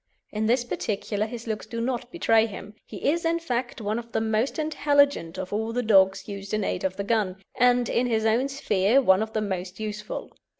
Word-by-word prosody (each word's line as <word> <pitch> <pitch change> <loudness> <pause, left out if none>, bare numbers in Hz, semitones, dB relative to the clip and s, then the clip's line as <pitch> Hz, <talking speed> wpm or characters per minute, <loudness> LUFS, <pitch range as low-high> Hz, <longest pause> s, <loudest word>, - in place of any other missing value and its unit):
In 215 0 -1
this 240 +2 +3
particular 215 -2 -2
his 235 0 -7
looks 220 -2 -4
do 230 - -5
not 245 0 -2
bewray 225 -2 +3
him; 205 0 -9
he 205 +2 -4
is, 340 +2 -1
in 330 0 +2
fact, 250 -8 -3
one 215 +1 -1
of 235 0 -11
the - - +2
most 220 +3 0
intelligent 285 - +2
of 190 +1 -5
all 220 +2 -1
the 245 +1 0
dogs 195 -3 +4
used 200 0 -4
in 215 - -1
aid 185 - -2
of 190 0 -1
the 200 - -2
gun, 200 -3 0 0.2
and 245 -1 +3
in 245 +2 +1
his 220 -2 0
own 230 +5 +2
sphere 215 -3 +2
one 190 -7 +4
of 220 0 -3
the 215 - 0
most 185 -2 -4
useful. 210 -1 -5
220 Hz, 215 wpm, -26 LUFS, 205-245 Hz, 0.2 s, dogs